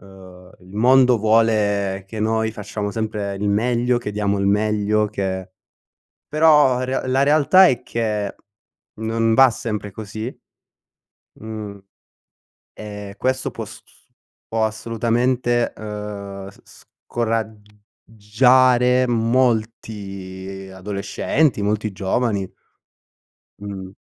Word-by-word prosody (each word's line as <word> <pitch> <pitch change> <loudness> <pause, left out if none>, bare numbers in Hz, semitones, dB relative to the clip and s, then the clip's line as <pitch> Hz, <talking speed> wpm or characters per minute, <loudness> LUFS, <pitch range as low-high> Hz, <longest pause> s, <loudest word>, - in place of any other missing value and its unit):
ehm, 95 -2 -15
il 95 +3 -13
mondo 125 +1 +5
vuole 105 -3 +2
che 110 +2 -7
noi 110 0 0
facciamo 105 -1 -5
sempre 105 -2 -3
il 100 +1 -2
meglio, 120 +3 +1
che 105 -3 -5
diamo 100 -1 0
il 100 - 0
meglio 105 +1 +1
che 95 -2 -4 0.8
però 150 -4 +5
re 130 0 -2
la 130 +2 +2
realtà 155 +6 +6
è 130 - +1
che 105 -3 -2 0.6
non 115 +1 0
va 135 +3 +7
sempre 105 -2 -4
così. 110 +4 -7 1.0
Mhmm, 105 -2 -7 0.9
e 105 -2 -8
questo 130 0 -1
può - - -7
s - - -12
s - - -26 0.4
può 110 0 -1
assolutamente, 120 +2 0
ehm, 100 -2 -7
s - - -19
s - - -18 0.2
scorag 115 -2 -2 0.5
giare 125 +3 +4
molti 110 -5 -2
adolescenti, 100 +7 -1
molti 105 +1 -1
giovani. 100 0 -1 1.1
Mh. 95 -2 -7
110 Hz, 105 wpm, -21 LUFS, 100-120 Hz, 1.1 s, va